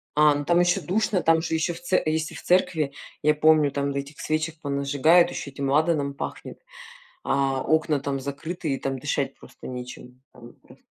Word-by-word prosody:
А, 150 0 +5
ну, 145 0 -3
там 175 +3 +3
ещё 175 0 +2
душно, 200 0 0
там 165 0 +3
же 160 - -3
ещё 160 +2 0
в 165 - -10
це 175 +1 +1
если 160 0 -1
в - - -8
церкви, 175 -5 +2 0.3
я 150 +1 +4
помню, 155 -1 +4
там, 140 0 -1
да, 140 - -1
этих 140 +1 -9
свечек 155 +1 -2
понажигают, 145 +4 +3
ещё 140 - -6
этим 135 0 -3
ладаном 150 -1 +1
пахнет, - - -7 0.6
а 135 -1 0
окна 155 -1 +1
там 140 0 -3
закрыты, 145 +3 -4
и 135 - -3
там 135 -1 -3
дышать - - -2
просто - - -12
нечем. 125 0 -9
Там 120 -1 -14
прос - - -18
150 Hz, 190 wpm, -25 LUFS, 140-165 Hz, 0.6 s, А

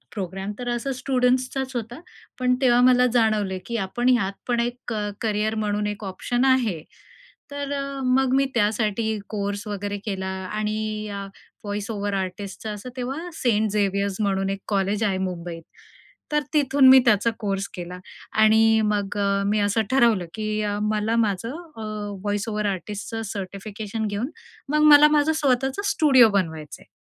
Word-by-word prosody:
Programme 195 +1 -4
तर 245 -1 -5
असा 240 +3 -2
स्टुडंट्सचाच 255 0 0
होता. 235 +4 -5 0.4
पण 250 0 +3
तेव्हा 245 -1 +5
मला 250 0 +5
जाणवलं, 215 -5 +2
की 235 - -3
आपण 240 +6 -1
यात 200 -6 +2 0.2
पण 240 -1 +1
एक 240 +1 -1 0.2
क - - -2 0.3
करियर 215 0 0
म्हणून 210 -1 -1
एक 205 0 -5
ऑप्शन 240 +7 -1
आहे. 230 -12 +2 0.7
तर 285 0 -4
अ, 280 -1 -1 0.2
मग 255 0 +2
मी 275 - +4
त्यासाठी 220 0 0
कोर्स 205 0 -3
वगैरे 205 0 -3
केला 190 -2 -3 0.3
आणि 215 0 -1 0.3
या 200 -1 -5 0.4
व्हॉईस 205 +1 -4
ओव्हर 205 -1 -2
आर्टिस्टचा 195 +3 -4
असं, 210 +4 -8
तेव्हा 270 +8 -4
सेंट 220 -6 +1
झेवियर्स 200 -1 0
म्हणून 195 -1 0
एक 195 0 -3
कॉलेज 200 +1 0
आहे 195 -2 0
मुंबईत. 170 -1 -7 0.7
तर 300 - +2
तिथून 275 -2 +5
मी 265 0 +10
त्याचा 215 0 +4
कोर्स 195 -2 -2
केला 180 -1 -7 0.4
आणि 220 0 +5
मग 205 -1 -1
अ, 200 0 +1
मी 210 +1 +1
असं 205 +2 +2
ठरवलं, 230 -9 +3
की 215 -1 -3
अ, 205 0 -1
मला 215 +2 0
माझं 205 +4 -3
अ, 310 -8 -9 0.4
वॉईस 205 +2 -1
ओव्हर 210 -1 -1
आर्टिस्टचं 205 +4 -5
सर्टिफिकेशन 205 +2 -5
घेऊन, 205 +7 -3 0.4
मग 300 0 +2
मला 295 +1 +8
माझं 300 +1 +3
स्वतःचं 265 +6 +1
स्टुडिओ 260 -7 +6
बनवायचं 160 -6 -3
आहे. - - -20
215 Hz, 160 wpm, -24 LUFS, 200-245 Hz, 0.7 s, मी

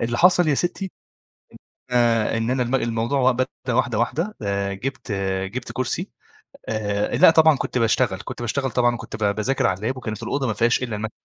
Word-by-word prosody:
اللي 120 +1 -1
حصل 180 -2 +5
يا 145 - +3
ستي 180 +5 -2 1.0
آآ، 115 -2 +2
إن 115 +2 -1
أنا 130 -1 +1
الم 125 +2 -2
الموضوع 120 +2 +1
بدأ 130 +1 0 0.3
واحدة، 120 -3 +1
واحدة، 160 - -1
آآ، 100 -1 -1
جِبت، 130 +2 -5 0.3
جِبت 120 +4 -6
كرسي 130 +1 -2 0.6
آآ، 105 -2 -1
لأ - - +8
طبعًا 160 -2 +5
كنت 130 - -3
باشتغل 105 -4 +1
كنت - - -7
باشتغل 135 +3 -1
طبعًا 120 -1 +2
وكنت 115 - -8
ب 100 0 +2
باذاكر 125 +4 +1
على 95 +6 -1
الlap 130 - -14
وكانت 110 -2 -5
الأوضة 135 +2 -1
ما 110 - 0
فيهاش 120 +3 +2
إلّا 120 -4 -3
المكتب 110 +1 -4
120 Hz, 185 wpm, -22 LUFS, 110-130 Hz, 1.0 s, لأ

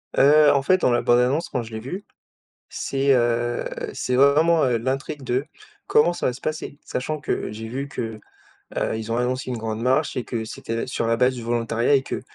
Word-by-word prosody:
Heu, 150 +2 +6
en 140 - +2
fait 185 +7 +3
dans 130 - +2
la 120 - +2
bande-annonce 125 +7 +2
quand 125 - -2
je 110 0 -11
l'ai 110 - -4
vue, 180 - -6 0.6
c'est, 135 0 +1
heu, 120 -1 +1 0.3
c'est 125 - -1
vraiment, 155 +5 +5
heu, 125 -2 +2
l'intrigue 135 +4 -3
de 130 +2 -1 0.4
comment 160 +4 +4
ça - - -4
va 125 - +1
se 130 - -11
passer? 155 -2 -4
Sachant 150 +4 -3
que 145 - -3
j'ai 110 +1 -7
vu 135 +5 -4
que, 115 -5 -5 0.6
heu, - - 0
ils 110 0 -5
ont 115 - 0
annoncé 125 +1 -1
une 125 - -2
grande 110 0 -4
marche 130 +5 +1
et 125 - -2
que 115 -2 -4
c'était 115 +1 -4
sur 125 - -2
la 115 0 +1
base 125 +2 +3
du 120 - -6
volontariat, 115 +2 +1
et 135 - +2
que - - -4
125 Hz, 215 wpm, -23 LUFS, 115-140 Hz, 0.6 s, Heu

